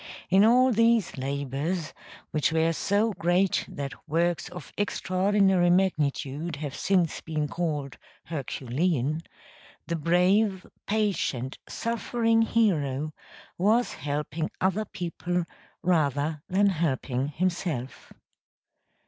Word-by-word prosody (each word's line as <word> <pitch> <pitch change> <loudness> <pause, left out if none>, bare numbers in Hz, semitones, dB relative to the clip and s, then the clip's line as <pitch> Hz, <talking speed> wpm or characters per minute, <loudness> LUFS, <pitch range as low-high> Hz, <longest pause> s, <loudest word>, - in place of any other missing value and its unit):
In 190 +2 +6
all 250 +3 +5
these 230 -3 +3
labors, 140 +5 -3 0.4
which 155 0 +1
were 160 +1 +2
so 205 +6 +1
great 175 +1 +2
that 140 -1 -5 0.2
works 170 +2 +1
of 180 +1 -10
extraordinary 190 -2 +2
magnitude 160 -4 0
have 145 -1 -5
since 185 -1 +1
been 155 -2 -2
called 150 -5 -3 0.2
Herculean, 145 +1 -1 0.6
the 170 - -2
brave, 185 +5 +2 0.2
patient, 195 - -1
suffering 230 0 +1
hero, 155 - +1 0.5
was 220 +6 +3
helping 150 +2 -3
other 195 +3 +1
people 175 -1 -3 0.4
rather 150 -3 +1
than 200 +2 +4
helping 140 -6 -1
himself. 155 -5 -3
170 Hz, 100 wpm, -27 LUFS, 145-195 Hz, 0.6 s, In